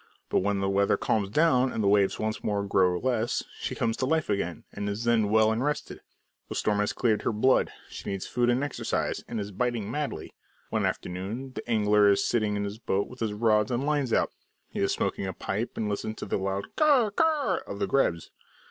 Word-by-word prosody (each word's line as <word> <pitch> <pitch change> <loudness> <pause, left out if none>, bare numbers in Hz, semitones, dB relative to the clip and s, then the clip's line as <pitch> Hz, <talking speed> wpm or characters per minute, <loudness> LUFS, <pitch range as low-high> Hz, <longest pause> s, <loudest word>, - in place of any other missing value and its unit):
But - - +3
when 100 +1 0
the 95 - 0
weather 100 +1 +2
calms 105 -3 0
down 130 0 +3
and 110 - -2
the - - +2
waves 100 -1 +3
once 110 0 -3
more 100 -1 0
grow 95 -3 +3
less, 120 0 0 0.2
she - - -3
comes 115 -1 0
to 130 - -1
life 160 -5 +1
again, 90 -4 -2
and 105 0 -3
is 100 +3 -3
then 115 -3 +2
well 110 0 +4
and 115 +3 0
rested. 150 +1 -3 0.5
The - - -5
storm 105 -1 +1
has 105 - +1
cleared 110 -4 +1
her - - 0
blood; 130 +5 +3 0.2
she - - -7
needs 95 -1 -3
food 120 0 +1
and 125 +3 +2
exercise, 145 - -2
and 115 - -4
is 100 0 -4
biting 120 0 -1
madly. 150 -1 -4 0.4
One - - +1
afternoon 100 +9 -4
the - - -7
angler 105 -2 +4
is 100 - +3
sitting 110 -3 +1
in 100 - -1
his 100 +2 -5
boat 100 -3 -1
with 125 - -12
all 115 - +2
his 105 -1 -5
rods 110 0 +3
and 125 +2 -1
lines 145 -4 0
out; - - +2 0.4
he - - -4
is - - +2
smoking 95 - -1
a 95 - -3
pipe 105 +7 -3
and 110 - -1
listening 105 +1 -3
to - - -6
the - - -1
loud 95 +1 -3
"karr 280 -9 +4
karr" 295 - +2
of 100 - -5
the - - 0
grebes. 85 -12 0
110 Hz, 225 wpm, -27 LUFS, 100-125 Hz, 0.5 s, well